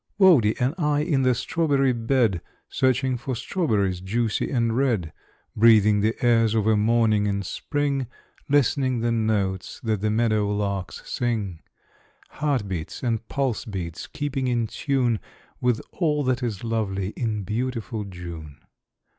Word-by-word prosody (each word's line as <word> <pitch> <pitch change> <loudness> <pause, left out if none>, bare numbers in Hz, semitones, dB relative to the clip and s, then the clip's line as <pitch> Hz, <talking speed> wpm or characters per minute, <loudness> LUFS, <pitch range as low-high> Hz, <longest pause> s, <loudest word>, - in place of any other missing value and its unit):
Wodie 160 - +5
and 125 +4 +1
I 150 -2 +2
in 150 -4 +1
the 130 -1 +3
strawberry 140 -1 +1
bed, 115 -6 +1 0.3
Searching 130 0 +1
for 130 +1 -4
strawberries 105 - 0
juicy 110 +3 -1
and 115 -4 +1
red; 115 - 0 0.4
Breathing 105 -2 +5
the 110 +2 +1
airs 115 -2 +4
of 110 -2 +1
a 110 0 +4
morning 110 -1 +3
in 100 0 -1
spring, 140 - -2 0.4
Listening 130 -3 +2
the 120 0 +1
notes 100 -5 -1
that 110 -4 -1
the 105 - +1
meadow 110 -2 +1
larks 100 -3 -3
sing; 105 -9 -2 0.7
Heart 140 -8 -1
beats 90 +2 -5
and 115 -2 -1
pulse 135 -5 -1
beats 90 -6 -6
keeping 140 -3 -3
in 120 -2 +1
tune 125 -2 0 0.4
With 125 -2 +1
all 150 -4 0
that 130 -1 0
is 115 -5 -3
lovely 100 -4 -1
in 110 -2 -3
beautiful 115 +1 -3
June. 85 -6 -8
115 Hz, 140 wpm, -24 LUFS, 105-130 Hz, 0.7 s, Wodie